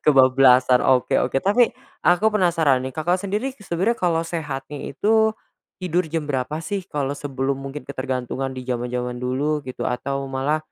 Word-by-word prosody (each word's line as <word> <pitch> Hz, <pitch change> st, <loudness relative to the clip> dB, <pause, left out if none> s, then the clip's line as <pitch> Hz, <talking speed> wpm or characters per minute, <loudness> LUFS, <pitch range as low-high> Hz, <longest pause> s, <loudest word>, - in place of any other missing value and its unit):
Kebablasan 130 Hz, -2 st, +5 dB
oke 130 Hz, -1 st, +3 dB
oke, -, -, 0 dB
tapi, 215 Hz, +5 st, +4 dB, 0.3 s
aku 175 Hz, +4 st, +3 dB
penasaran 165 Hz, -9 st, +3 dB
nih 130 Hz, -, -4 dB
Kakak 175 Hz, +3 st, +1 dB
sendiri 210 Hz, +7 st, -2 dB
sebenernya 190 Hz, +6 st, 0 dB
kalo 170 Hz, -5 st, +1 dB
sehatnya 150 Hz, -4 st, -5 dB
itu 220 Hz, +1 st, +2 dB, 0.5 s
tidur 180 Hz, -1 st, 0 dB
jam 160 Hz, -2 st, -2 dB
berapa 145 Hz, +1 st, -2 dB
sih? 190 Hz, +5 st, -3 dB
Kalo 145 Hz, -1 st, -1 dB
sebelum 140 Hz, -1 st, -2 dB
mungkin 135 Hz, +2 st, -7 dB
ketergantungan 130 Hz, -1 st, -3 dB
di 130 Hz, -1 st, -8 dB
jaman-jaman 125 Hz, 0 st, -2 dB
dulu 145 Hz, +4 st, -1 dB
gitu 130 Hz, -2 st, -5 dB
atau 135 Hz, +2 st, -2 dB
malah, 135 Hz, +3 st, 0 dB
140 Hz, 150 wpm, -22 LUFS, 130-170 Hz, 0.5 s, Kebablasan